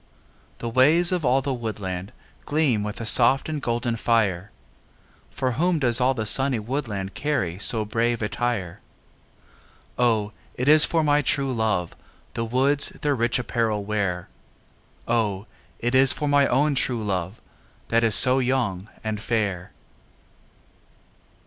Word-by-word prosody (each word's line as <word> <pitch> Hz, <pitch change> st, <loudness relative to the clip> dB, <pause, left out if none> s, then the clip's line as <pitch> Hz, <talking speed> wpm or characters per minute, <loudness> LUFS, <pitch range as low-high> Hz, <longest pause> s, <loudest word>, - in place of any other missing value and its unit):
The 120 Hz, -, -6 dB
ways 150 Hz, +9 st, +3 dB
of 180 Hz, -3 st, -1 dB
all 130 Hz, +1 st, +2 dB
the 140 Hz, -, -2 dB
woodland 100 Hz, -5 st, -5 dB, 0.4 s
Gleam 145 Hz, -8 st, +1 dB
with 105 Hz, 0 st, -5 dB
a 115 Hz, -, -5 dB
soft 120 Hz, +4 st, +4 dB
and 155 Hz, -2 st, -4 dB
golden 120 Hz, -1 st, -2 dB
fireâ 105 Hz, -6 st, 0 dB, 0.8 s
For 130 Hz, -1 st, -2 dB
whom 170 Hz, +7 st, 0 dB
does 125 Hz, -4 st, +1 dB
all 130 Hz, +1 st, +2 dB
the 110 Hz, -3 st, -3 dB
sunny 135 Hz, +3 st, +2 dB
woodland 105 Hz, -5 st, -4 dB
Carry 95 Hz, -, -2 dB
so 110 Hz, +2 st, +3 dB
brave 115 Hz, +1 st, -1 dB
attire? 105 Hz, -5 st, -3 dB, 1.2 s
O, 110 Hz, -4 st, +1 dB, 0.2 s
it 125 Hz, -, -3 dB
is 155 Hz, +1 st, +7 dB
for 165 Hz, -2 st, 0 dB
my 145 Hz, 0 st, +2 dB
true 135 Hz, -1 st, 0 dB
love 110 Hz, -7 st, -1 dB, 0.4 s
The 115 Hz, -, -3 dB
woods 135 Hz, +5 st, +1 dB
their 145 Hz, -1 st, +1 dB
rich 120 Hz, -2 st, +1 dB
apparel 115 Hz, -4 st, -2 dB
wearâ 100 Hz, -4 st, -2 dB, 0.8 s
O, 105 Hz, -4 st, -1 dB, 0.3 s
it 120 Hz, +1 st, -2 dB
is 130 Hz, 0 st, +6 dB
for 150 Hz, -, -3 dB
my 145 Hz, -1 st, +3 dB
own 145 Hz, +4 st, +1 dB
true 125 Hz, -4 st, 0 dB
love, 95 Hz, 0 st, -3 dB, 0.5 s
That 115 Hz, 0 st, +2 dB
is 110 Hz, -3 st, +4 dB
so 130 Hz, +1 st, +6 dB
young 120 Hz, -7 st, -2 dB
and 110 Hz, -1 st, -4 dB
fair. 105 Hz, -6 st, -2 dB
120 Hz, 145 wpm, -23 LUFS, 105-135 Hz, 1.2 s, is